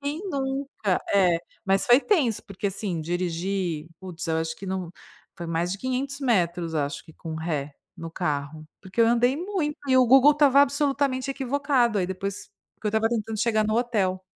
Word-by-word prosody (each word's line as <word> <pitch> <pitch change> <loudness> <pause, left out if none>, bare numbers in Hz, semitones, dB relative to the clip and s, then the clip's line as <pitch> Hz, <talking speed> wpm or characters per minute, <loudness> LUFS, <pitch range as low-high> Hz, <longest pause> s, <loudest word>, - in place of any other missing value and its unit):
Quem 285 +4 -3
nunca, 270 - -1
é. 180 -4 +4 0.3
Mas 195 0 +2
foi 245 +2 +6
tenso 265 - +1
porque, 200 +1 -3
assim, 195 -3 -3
dirigir, 175 -1 -2
putz 180 -2 -7
eu 160 - +1
acho 160 0 -3
que 195 - -10
não 185 -2 -3 0.5
foi 170 - -6
mais 165 +2 -1
de 195 - -5
500 270 +3 -3
metros 175 -9 0
acho 145 -1 -2
que 160 - -15
com 160 0 -7
ré 155 -3 -3 0.2
no 165 0 -7
carro, 155 -2 -3 0.2
porque 190 +3 -4
eu 230 - +6
andei 245 +3 +3
muito 345 -4 -2
e 260 - +4
o 255 -1 +6
Google 270 +4 +7
estava 285 -2 +5
absolutamente 275 -2 0
equivocado, 265 -4 +1
aí 180 - 0
depois 190 +1 -5 0.3
porque 215 - -7
eu - - +3
estava 220 +1 +2
tentando 225 -1 -2
chegar 220 -2 +2
no 215 - 0
hotel. 200 -6 0
205 Hz, 185 wpm, -25 LUFS, 175-265 Hz, 0.5 s, Google